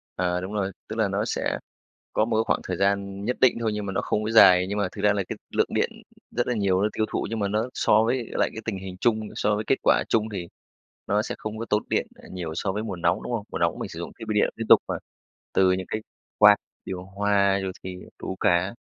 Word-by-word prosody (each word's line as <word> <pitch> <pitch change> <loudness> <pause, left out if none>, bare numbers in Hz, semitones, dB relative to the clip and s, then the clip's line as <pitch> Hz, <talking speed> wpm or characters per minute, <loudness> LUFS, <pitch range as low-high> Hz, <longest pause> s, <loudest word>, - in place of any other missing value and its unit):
À, 90 0 0
đúng 95 +3 -6
rồi, 100 -2 -1 0.2
tức 110 - -5
là 110 - +3
nó 100 +2 -1
sẽ - - -1 0.6
có 110 - +3
một 110 -1 0
cái 110 - +3
khoảng - - +1
thời 90 - -2
gian 100 0 0
nhất 125 +2 -1
định 130 -2 +5
thôi 115 -2 0
nhưng 105 -1 -3
mà 95 - -4
nó - - 0
không 105 - -1
có 110 - -2
dài 90 -5 +7
nhưng 100 - -2
mà 100 -2 +1
thực 100 - -7
ra 105 0 +4
là 100 - 0
cái - - -4 0.2
lượng - - +3
điện - - +2 0.4
rất 120 - -1
là 125 - +1
nhiều, 100 -3 +1
nó 105 - +2
tiêu 110 - +1
thụ - - -1
nhưng 115 0 -3
mà 100 - +1
nó 110 +4 -1
so 110 +1 +4
với 120 +1 0
lại - - +1
cái 110 - -6
tình 110 -4 -2
hình 95 -1 -7
chung 115 -2 +2 0.2
so 105 - +1
với 105 - -2
kết 135 - +4
quả - - +4
chung 110 -1 +1
thì 90 -3 -4 0.6
nó 105 +1 +2
sẽ - - -4
không 110 0 -5
có 115 - -3
tốn 105 0 +2
điện, - - +1
à, - - -15
nhiều 90 -4 -5
so 95 +3 -1
với 105 +3 -3
mùa 100 -5 -4
nóng, 85 0 0
đúng - - -4
không? 110 -3 -2
Mùa - - -3
nóng - - 0
mình - - -4
sử - - -8
dụng - - -5
thiết 115 - -6
bị 110 - -1
điện 105 - +3
liên 115 - -5
tục - - +9
mà, - - -2 0.6
từ 95 -1 +4
những 95 0 -1
cái 110 - -2 0.4
quạt, 105 -1 +8 0.3
điều 90 -1 -5
hòa 100 0 +2
rồi 95 - -2
thì 90 0 -5 0.2
đủ 95 - -4
cả. 90 +3 +2
105 Hz, 275 wpm, -25 LUFS, 95-110 Hz, 0.6 s, tục